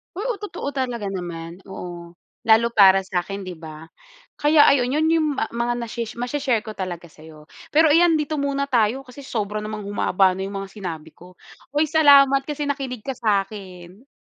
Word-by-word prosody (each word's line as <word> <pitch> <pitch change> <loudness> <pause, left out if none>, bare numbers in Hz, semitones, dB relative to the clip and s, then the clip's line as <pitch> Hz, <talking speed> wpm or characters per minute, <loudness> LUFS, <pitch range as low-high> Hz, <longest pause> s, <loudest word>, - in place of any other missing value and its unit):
Oo, 425 +1 -3
totoo 410 -8 -5
talaga 245 -7 -3
naman. 175 -2 -6
Oo, 175 -2 -9 0.3
lalo 225 +1 +5
para 195 -3 +6
sa'kin 190 +2 -4
'di 185 -1 -7
ba? 155 -1 -10 0.6
Kaya 295 0 +6
ayun, 255 -2 +2
yon 310 +2 +2
yung 325 -2 +2
ma 225 - -2
mga 235 +1 -1
nashe 235 0 -4
mashe-share 245 -2 -1
ko 220 - -7
talaga 175 -3 -5
sa'yo. 155 0 -15 0.2
Pero 315 0 +5
iyan, 330 +1 +5
dito 305 0 -2
muna 280 0 -1
tayo, 245 +1 +1
kasi 265 +2 -12
sobra 215 -3 -3
namang 215 0 -6
humaba 195 -1 +2
na 190 - -3
yung 200 - -7
mga 195 - -10
sinabi 165 -6 -7
ko. 180 +3 -16 0.4
Hoy, 305 +1 +2
salamat 275 -3 +6
kasi 295 -1 -3
nakinig 265 -5 -4
ka 270 -3 -5
sa'kin! 195 -1 -3
225 Hz, 175 wpm, -22 LUFS, 190-280 Hz, 0.6 s, para